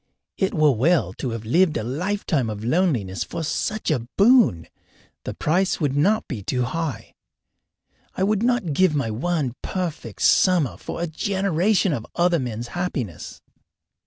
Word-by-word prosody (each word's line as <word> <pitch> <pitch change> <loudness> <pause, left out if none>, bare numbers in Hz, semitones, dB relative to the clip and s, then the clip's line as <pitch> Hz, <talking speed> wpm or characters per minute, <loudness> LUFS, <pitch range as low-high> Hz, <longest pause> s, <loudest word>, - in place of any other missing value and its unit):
It 190 0 -1
were 155 -2 +4
well 130 - +2
to 130 - -2
have 115 -1 -5
lived 165 +8 +3
a 110 - -3
lifetime 155 - -1
of 105 0 -6
loneliness 120 - 0
for 165 - -5
such 210 +5 -2
a 120 -6 -1
boon 205 - +4 0.6
the - - -5
price 180 +5 +1
would 145 -4 0
not 200 +10 +2
be 120 -7 -5
too 125 +5 -1
high. 155 0 -4 1.0
I 185 - -1
would 210 +1 +1
not 240 -9 +1
give 185 0 +3
my 135 -6 -1
one 145 +2 -1
perfect 165 - -4
summer 165 - +3
for 165 - -6
a - - +1
generation 190 +1 +1
of 115 -5 -4
other 175 -1 +2
men's 120 -2 -4
happiness. 130 - -5
155 Hz, 155 wpm, -23 LUFS, 120-185 Hz, 1.0 s, were